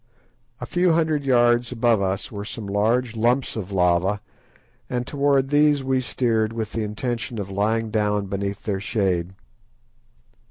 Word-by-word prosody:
A - - -5
few 180 -1 +2
hundred 160 -3 +1
yards 120 -2 +3
above 115 -3 +2
us 95 +1 -2
were 100 -2 -5
some 105 0 -6
large 115 +4 0
lumps 120 +4 +1
of 100 -3 -5
lava, 90 +2 +2 0.7
and 125 -1 -2
towards 140 -1 +1
these 145 -1 +4
we 130 0 +1
steered 115 -3 0
with 110 -2 -4
the 115 - -2
intention 115 +2 -3
of 100 -2 -5
lying 110 +3 0
down 105 -1 0
beneath 100 +1 -4
their 100 -3 -2
shade. 95 -4 -1
115 Hz, 150 wpm, -23 LUFS, 100-125 Hz, 0.7 s, these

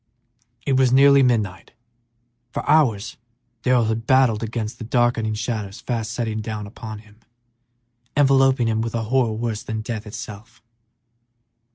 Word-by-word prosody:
It 135 -2 +2
was 130 -2 +3
nearly 140 +1 +6
midnight. 110 -9 0 0.8
For - - -5
hours 125 -7 +2 0.4
Darrell 125 -2 +3
had 110 +1 -2
battled 130 -5 +4
against 115 0 -4
the - - -6
darkening 115 -2 +1
shadows 105 -3 -4
fast 115 -4 -3
settling 110 -2 -3
down 105 -1 -5
upon 110 +1 -8
him, 105 0 -20 1.0
enveloping 135 -3 +4
him 110 0 0
with 115 0 -3
a 115 - -1
horror 120 0 +1
worse 110 -1 -3
than 110 0 -4
death 110 -1 -5
itself. 110 -1 -9
115 Hz, 140 wpm, -22 LUFS, 110-125 Hz, 1.0 s, nearly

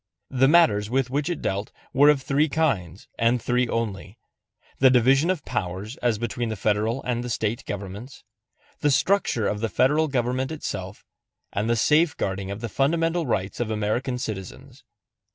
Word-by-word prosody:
The 135 0 +3
matters 110 -11 +4
with 130 0 0
which 145 +4 -1
it 175 - -4
dealt 100 +2 -2 0.2
were 145 +2 +6
of 140 -3 +3
three 145 +3 +1
kinds, 105 - -1
and 115 +1 +3
three 125 +2 0
only 105 -3 -4 0.6
the 130 - +7
division 130 +6 +4
of 185 -6 -1
powers 100 0 -4
as 120 -3 0
between 120 +1 -3
the 110 - -3
Federal 110 +5 0
and 120 -1 -2
the 125 - -5
State 110 0 -2
governments, 105 +6 -7 0.6
the 145 - +2
structure 135 - +2
of 105 - -2
the 115 +1 -1
Federal 150 +9 +2
government 130 0 -1
itself, 95 -11 -6 0.5
and 105 +3 -1
the 120 - +3
safeguarding 115 - +1
of 100 +2 -6
the 120 - -3
fundamental 165 - +1
rights 95 -4 -2
of 120 -2 -1
American 110 +4 -1
citizens. 125 +4 -7
120 Hz, 165 wpm, -24 LUFS, 105-135 Hz, 0.6 s, the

